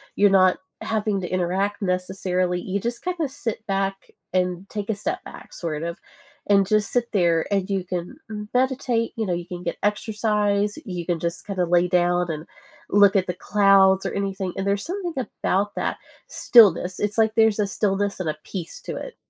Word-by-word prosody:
you're 205 Hz, 0 st, +5 dB
not 185 Hz, -1 st, +5 dB, 0.2 s
having 210 Hz, -3 st, -1 dB
to 175 Hz, -, -4 dB
interact 185 Hz, +3 st, -1 dB
necessarily, 180 Hz, -1 st, -1 dB
you 195 Hz, +2 st, -2 dB
just 235 Hz, +3 st, -4 dB
kinda 345 Hz, -6 st, -2 dB
sit 225 Hz, -5 st, -4 dB
back, 195 Hz, 0 st, -2 dB, 0.2 s
and 180 Hz, +1 st, 0 dB
take 205 Hz, 0 st, -5 dB
a 220 Hz, -, +1 dB
step 205 Hz, -, -3 dB
back -, -, -12 dB
sort 155 Hz, -3 st, -4 dB
of, 170 Hz, +1 st, -4 dB, 0.5 s
and 195 Hz, -2 st, +4 dB
just 215 Hz, 0 st, +1 dB
sit 245 Hz, -1 st, +2 dB
there, 170 Hz, -4 st, +2 dB
and 195 Hz, 0 st, 0 dB
you 190 Hz, -2 st, -1 dB
can 175 Hz, -, -5 dB, 0.4 s
meditate, 250 Hz, -2 st, +1 dB
you 220 Hz, -1 st, -1 dB
know, 180 Hz, -, -2 dB
you 175 Hz, 0 st, -3 dB
can 180 Hz, 0 st, -7 dB
get 170 Hz, -, -3 dB
exercise, 210 Hz, -1 st, 0 dB
you 180 Hz, -3 st, -5 dB
can 175 Hz, -2 st, -1 dB
just 170 Hz, +4 st, -3 dB
kinda 185 Hz, -3 st, 0 dB
lay 175 Hz, +1 st, +3 dB
down, 175 Hz, -1 st, +2 dB
and 155 Hz, +1 st, -4 dB, 0.4 s
look 200 Hz, 0 st, +5 dB
at 190 Hz, -1 st, +3 dB
the 180 Hz, -, -1 dB
clouds, 195 Hz, 0 st, +4 dB
or -, -, -1 dB
anything, 195 Hz, -2 st, -2 dB
and 195 Hz, +1 st, -2 dB
there's 200 Hz, 0 st, +1 dB
something 355 Hz, -2 st, -4 dB, 0.3 s
about 205 Hz, +2 st, +1 dB
that -, -, -2 dB, 0.3 s
stillness, 185 Hz, -5 st, +5 dB
it's 210 Hz, +1 st, -1 dB
like 220 Hz, -1 st, +3 dB
there's 220 Hz, -2 st, +4 dB
a 205 Hz, -, +3 dB
stillness, 200 Hz, -1 st, -1 dB
and 165 Hz, -4 st, -1 dB
a 150 Hz, -, -3 dB
peace 180 Hz, -4 st, -6 dB
to -, -, -6 dB
it. -, -, -7 dB
195 Hz, 190 wpm, -23 LUFS, 180-210 Hz, 0.5 s, you're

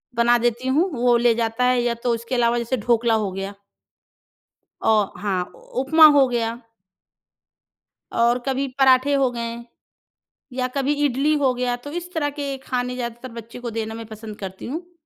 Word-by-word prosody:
बना 240 Hz, +1 st, +4 dB
देती 240 Hz, +2 st, 0 dB
हूँ, 320 Hz, +8 st, +2 dB
वो 245 Hz, -1 st, +3 dB
ले 235 Hz, -1 st, +3 dB
जाता 230 Hz, +1 st, -1 dB
है 250 Hz, -1 st, +3 dB
या 240 Hz, -1 st, 0 dB
तो 245 Hz, -, +2 dB
उसके 235 Hz, +3 st, -4 dB
अलावा 240 Hz, -1 st, +2 dB
जैसे 240 Hz, +2 st, -1 dB
ढोकला 235 Hz, -1 st, +3 dB
हो 190 Hz, -, -3 dB
गया। 195 Hz, +1 st, -5 dB, 1.3 s
औ -, -, +3 dB, 0.3 s
हाँ, 190 Hz, -3 st, 0 dB
उपमा 310 Hz, +5 st, +3 dB
हो 270 Hz, -2 st, +6 dB
गया। 235 Hz, -1 st, -2 dB, 1.6 s
और 235 Hz, +1 st, +3 dB
कभी 270 Hz, +1 st, -1 dB
पराँठे 265 Hz, +1 st, +5 dB
हो 275 Hz, -2 st, +3 dB
गए। 235 Hz, -1 st, -4 dB, 1.0 s
या 255 Hz, 0 st, -1 dB
कभी 275 Hz, +1 st, +1 dB
इडली 280 Hz, +3 st, +1 dB
हो 265 Hz, -3 st, +2 dB
गया, 245 Hz, 0 st, -1 dB
तो 245 Hz, +4 st, -10 dB
इस 350 Hz, +2 st, -6 dB
तरह 295 Hz, -3 st, 0 dB
के 280 Hz, -1 st, -4 dB
खाने 250 Hz, -1 st, -2 dB
ज़्यादातर 240 Hz, 0 st, -6 dB
बच्चे 230 Hz, +1 st, -9 dB
को 245 Hz, -, -5 dB
देना 220 Hz, 0 st, -4 dB
मैं 225 Hz, 0 st, -7 dB
पसंद 220 Hz, 0 st, -9 dB
करती 190 Hz, -1 st, -7 dB
हूँ। 340 Hz, +7 st, -6 dB
245 Hz, 170 wpm, -22 LUFS, 230-270 Hz, 1.6 s, हो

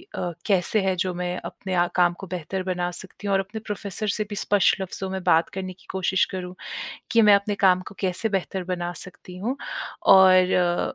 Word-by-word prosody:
अ, 175 Hz, -1 st, -2 dB
कैसे 195 Hz, +1 st, +2 dB
है 190 Hz, -1 st, +1 dB
जो 185 Hz, 0 st, -1 dB
मैं 180 Hz, 0 st, -3 dB
अपने 190 Hz, -1 st, -6 dB
अ, 175 Hz, 0 st, +4 dB
काम 175 Hz, -1 st, +4 dB
को 195 Hz, -, -8 dB
बेहतर 180 Hz, +1 st, -4 dB
बना 180 Hz, -1 st, -1 dB
सकती 190 Hz, +3 st, -8 dB
हूँ 200 Hz, -, +1 dB
और 195 Hz, -, +3 dB
अपने 195 Hz, +3 st, -5 dB
प्रोफेसर 205 Hz, 0 st, -3 dB
से 215 Hz, +2 st, 0 dB
भी 205 Hz, -, -5 dB
स्पष्ट 200 Hz, -1 st, +2 dB
लफ्जों 190 Hz, 0 st, -4 dB
में 190 Hz, -1 st, -4 dB
बात 165 Hz, 0 st, +3 dB
करने 185 Hz, -1 st, -5 dB
की 180 Hz, 0 st, -24 dB
कोशिश 190 Hz, 0 st, +1 dB
करूँ, 180 Hz, -1 st, -6 dB, 0.6 s
कि 230 Hz, -, +5 dB
मैं 210 Hz, -1 st, +7 dB
अपने 200 Hz, +1 st, +1 dB
काम 185 Hz, -2 st, +4 dB
को -, -, -14 dB
कैसे 190 Hz, +3 st, 0 dB
बेहतर 190 Hz, -2 st, -2 dB
बना 175 Hz, -1 st, -3 dB
सकती 185 Hz, -1 st, -11 dB
हूँ। 235 Hz, +8 st, -2 dB, 0.5 s
और 185 Hz, -2 st, +5 dB
185 Hz, 205 wpm, -24 LUFS, 180-195 Hz, 0.6 s, मैं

